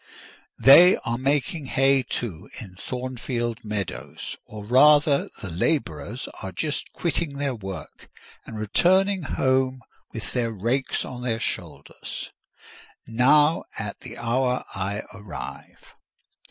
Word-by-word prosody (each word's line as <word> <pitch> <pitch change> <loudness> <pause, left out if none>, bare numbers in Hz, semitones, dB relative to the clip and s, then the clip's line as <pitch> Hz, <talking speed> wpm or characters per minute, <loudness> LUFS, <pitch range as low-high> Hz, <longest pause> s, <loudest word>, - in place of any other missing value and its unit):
They 170 +7 +8
are 120 +1 -1
making 140 +3 0
hay, 135 +1 +3
too, 105 -6 -5
in 100 -5 -9
Thornfield 120 +1 -4
meadows: 105 -3 -5
or 105 -1 -9
rather, 145 +4 +5
the 95 - -5
labourers 100 - -1
are 95 - -5
just 150 - -3
quitting 165 -4 -1
their 140 -2 -1
work, 95 -5 -8 0.4
and 110 - -7
returning 185 - +3
home 130 -2 +1 0.3
with 110 - -6
their 120 -2 0
rakes 120 +6 -1
on 125 -1 -7
their 115 -2 -1
shoulders, - - -5 0.7
now, 145 +7 +4
at - - -5
the - - -10
hour 125 +2 0
I 100 +2 -3
arrive. 85 -8 -9
125 Hz, 115 wpm, -25 LUFS, 105-140 Hz, 0.7 s, They